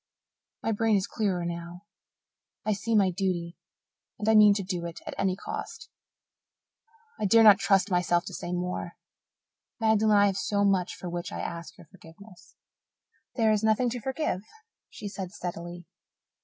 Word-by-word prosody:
My 225 - 0
brain 220 0 +2
is 195 -1 +1
clearer 190 -5 -1
now. 170 +2 -6 0.8
I 215 - +2
see 225 +3 -1
my 195 -3 +4
duty 175 -2 -2 0.6
and 210 - -4
I 220 - +5
mean 210 -1 +7
to 200 - -2
do 180 -2 -3
it 170 - -8
at - - -5
any 190 -2 0
cost. 430 - -7 1.3
I 215 - 0
dare 225 +3 +6
not 210 -2 +8
trust 195 0 +2
myself 175 -1 +2
to - - -7
say 175 - -5
more. 180 -1 -3 0.9
Magdalen, 220 -1 +3
I 205 - +6
have 195 -1 +1 0.2
much 195 -3 +2
for 180 - -8
which 175 0 -4
to - - -7
ask 170 -1 -6
your - - -14
forgiveness." 180 +3 -17 0.8
"There 225 -3 +3
is 215 0 +1
nothing 220 +3 +2
to 245 0 -5
forgive," 265 - -2 0.5
she 205 - -8
said 195 -2 -6
steadily. 175 -1 -6
195 Hz, 160 wpm, -27 LUFS, 175-215 Hz, 1.3 s, not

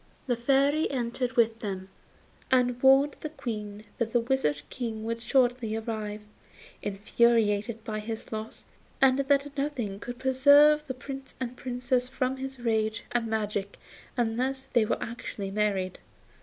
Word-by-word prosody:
The 245 - +1
Fairy 275 +5 +2
entered 250 -1 -2
with 230 -1 +3
them, 190 -3 -5 0.6
and 250 -1 +2
warned 270 +2 +5
the 310 - -5
Queen 210 -8 -6 0.2
that 230 -1 -1
the 240 - +5
Wizard 230 - 0
King 225 -4 -4
would 230 +1 -3
shortly 245 -3 +2
arrive, 215 -2 -4 0.6
infuriated 215 +1 +1
by 215 -1 -3
his 225 +1 -6
loss, 220 0 -6 0.3
and 265 0 +5
that 280 +1 +1
nothing 260 -9 -2
could 245 +2 -6
preserve 285 +4 +5
the 260 - -4
Prince 270 +1 -8
and 250 -1 -4
Princess 250 0 -1
from 260 0 -1
his 265 0 -6
rage 220 -2 0
and 240 -1 0
magic 210 -2 -2 0.4
unless 250 +3 0
they 235 -3 +4
were - - 0
actually 210 -4 -5
married. 195 -3 0
240 Hz, 140 wpm, -28 LUFS, 220-265 Hz, 0.6 s, warned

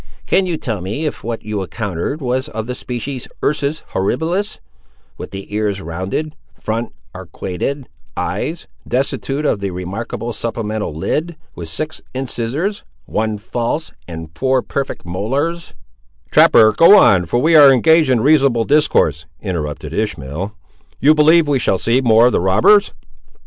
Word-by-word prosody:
"Can 190 -1 +2
you 170 -3 -1
tell 110 -10 -4
me 105 - -3
if 150 - -4
what 115 -1 -5
you 105 -2 -3
encountered 100 - -4
was 130 +2 -1
of 110 -3 -5
the 125 - -4
species, 125 +1 -5 0.2
ursus 150 +1 -1
horribilis—with 160 - -4
the 100 +1 -9
ears, 105 -2 -1
rounded—front, 110 - -5 0.2
arquated—eyes—destitute 135 - -4
of 110 - +1
the 100 0 -3
remarkable 100 +6 -5
supplemental 110 -4 -3
lid—with 150 - -4
six 155 - -5
incisores, 135 - -2 0.2
one 110 0 -2
false, 120 +8 -3 0.2
and 80 -2 -8
four 130 +2 +1
perfect 140 -8 -4
molares—" 135 - -3 0.6
"Trapper, 110 -1 +6
go 165 - +7
on, 95 - +5
for 85 - 0
we 160 +5 +3
are 145 -3 +9
engaged 160 +3 +4
in 125 -3 +3
reasonable 135 -4 +3
discourse," 145 - +2
interrupted 75 -5 -4
Ishmael; 90 -2 -3 0.5
"you 150 +3 +5
believe 155 +1 +5
we 140 -2 +2
shall 95 - +1
see 115 +7 +1
more 115 -2 +5
of 125 - +4
the - - +1
robbers." 110 - +4
120 Hz, 135 wpm, -18 LUFS, 100-150 Hz, 0.6 s, are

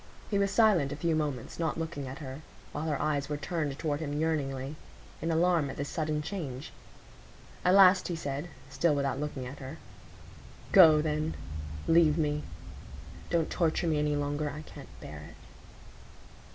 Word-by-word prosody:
He 200 - +2
was 200 0 +2
silent 195 -9 +4
a - - -3
few 170 -2 0
moments, 145 -5 -3
not 160 -2 0
looking 160 -4 -4
at 130 +2 -6
her; 140 -2 -7 0.3
while 155 - -4
her 150 -3 -1
eyes 145 -2 0
were 150 - -1
turned 150 -3 -2
toward 150 -3 -1
him 145 -2 -3
yearningly, 140 -3 -1 0.5
in 165 - -1
alarm 165 -2 +3
at - - -7
this 145 0 -3
sudden 155 -2 -1
change. 150 -7 -5 0.9
At 180 +1 +5
last 185 -1 +7
he 175 - -2
said, 145 0 -4 0.2
still 145 +3 +1
without 140 -2 0
looking 145 -3 -4
at 130 +3 -8
her,— 135 -1 -7 0.9
"Go, 160 -5 +8
then,—leave 150 - 0
me; 150 -2 0 0.9
don't 165 -2 +1
torture 165 0 +1
me 155 -3 +2
any 150 0 +1
longer,—I 145 +1 -2
can't - - -12
bear 75 - -8
it." 75 - -12
150 Hz, 160 wpm, -30 LUFS, 140-165 Hz, 0.9 s, Go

